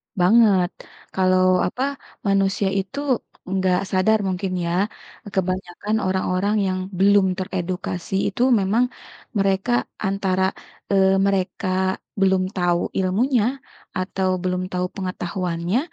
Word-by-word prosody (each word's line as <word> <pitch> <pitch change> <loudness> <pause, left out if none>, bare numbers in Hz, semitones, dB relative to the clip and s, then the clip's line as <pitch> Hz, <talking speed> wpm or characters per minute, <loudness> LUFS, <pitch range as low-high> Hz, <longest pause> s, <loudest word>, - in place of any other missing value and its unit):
Banget, 190 -1 +5 0.4
kalau 185 -1 +3
apa 250 +8 -2 0.4
manusia 195 0 +2
itu 200 +9 -5 0.5
enggak 185 -1 +2
sadar 205 +4 +3
mungkin 185 0 -2
ya, 170 - -1 0.6
kebanyakan 185 +2 -1
orang-orang 190 +2 0
yang 185 -1 -1 0.2
belum 200 0 +5
teredukasi 185 -1 -4
itu 205 - -3 0.2
memang, 200 +5 +2 0.5
mereka 195 +3 +1 0.4
antara, 190 -1 0 0.5
eee, 190 -1 +4
mereka 195 +1 -1 0.5
belum 190 -1 +3
tahu 175 -2 +2 0.2
ilmunya, 215 +6 +2 0.5
atau 185 0 -1
belum 180 0 0
tahu 180 0 -1
pengetahuannya, 180 +1 -2
190 Hz, 100 wpm, -22 LUFS, 185-195 Hz, 0.6 s, Banget